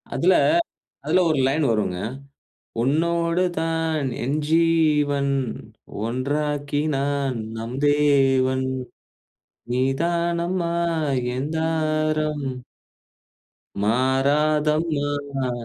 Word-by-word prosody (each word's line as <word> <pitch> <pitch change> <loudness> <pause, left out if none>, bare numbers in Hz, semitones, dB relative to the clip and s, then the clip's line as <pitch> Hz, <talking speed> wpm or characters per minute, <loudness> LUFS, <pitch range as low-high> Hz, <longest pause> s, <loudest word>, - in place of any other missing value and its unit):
அதுல, 185 +3 +4 0.7
அதுல - - +3
ஒரு 155 - +1
லைன் 145 +3 +1
வருங்க. 105 -5 0 0.8
"உன்னோடு 170 +5 +1 0.2
தான் 160 -3 -1 0.2
என்ஜீவன், 150 -1 +2 0.7
ஒன்றாக்கி 145 +3 -1 0.2
நான் 140 -2 -1 0.2
நம் 115 +3 -5
தேவன். 135 -3 +3 1.1
நீதானமா 170 +6 0 0.6
என் 140 +3 -2
தாரம்!" 155 -2 0 1.4
மாறாதம்மா 145 +2 +1
150 Hz, 60 wpm, -23 LUFS, 135-160 Hz, 1.4 s, அதுல